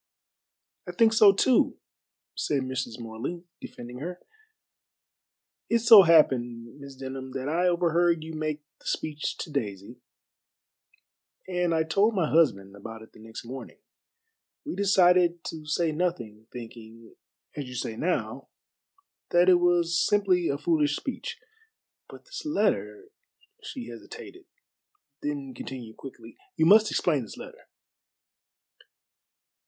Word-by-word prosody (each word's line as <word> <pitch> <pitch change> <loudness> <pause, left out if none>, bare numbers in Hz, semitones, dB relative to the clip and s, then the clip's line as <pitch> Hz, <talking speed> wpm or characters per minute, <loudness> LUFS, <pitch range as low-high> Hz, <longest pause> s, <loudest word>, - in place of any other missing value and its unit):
"I - - -5
think 225 -1 +4
so 215 -2 +7
too," 240 +6 +2 0.6
said 140 -3 -1
Mrs. 130 -3 -4
Morley, 115 +10 -6 0.2
defending 120 +1 -9
her. 175 +5 -6 1.5
"It 235 - +4
so 230 -2 +9
happened, 125 -7 +2
Miss 140 -1 -11
Denham, 130 0 -7
that 135 0 -4
I 170 +4 +1
overheard 170 -1 +2
you 160 +1 -8
make 155 -1 -3 0.2
the - - -14
speech 150 -1 -3
to 155 - -6
Daisy, 115 -2 -5 1.5
and 180 -2 0
I 160 - +2
told 200 +7 +2
my 175 -5 +1
husband 105 -13 +2
about 110 +2 -9
it 110 - -17
the - - -17
next 110 +1 -10
morning. 130 +3 -9 0.9
We 300 - -4
decided 180 -3 +3
to 155 -2 -9
say 160 +2 +1
nothing, 150 -11 -3
thinking 115 -1 -11 0.4
as 145 - -4
you 125 - -9
say 115 -2 -3
now 175 +10 -2 0.8
that 175 +1 +4
it 180 -1 +6
was 170 -2 +2
simply 190 -5 +2
a 140 - -1
foolish 150 -1 +1
speech. 265 - -5 0.7
But - - -13
this - - -8
letter" 155 - -1 0.5
she 270 - -7
hesitated, 115 - -11 0.8
then 140 -2 -4
continued 120 -2 -8
quickly, 135 - -12 0.2
"you 160 - +2
must 215 +5 +6
explain 150 -6 +1
this 110 - -10
letter." - - -12
155 Hz, 125 wpm, -27 LUFS, 125-175 Hz, 1.5 s, so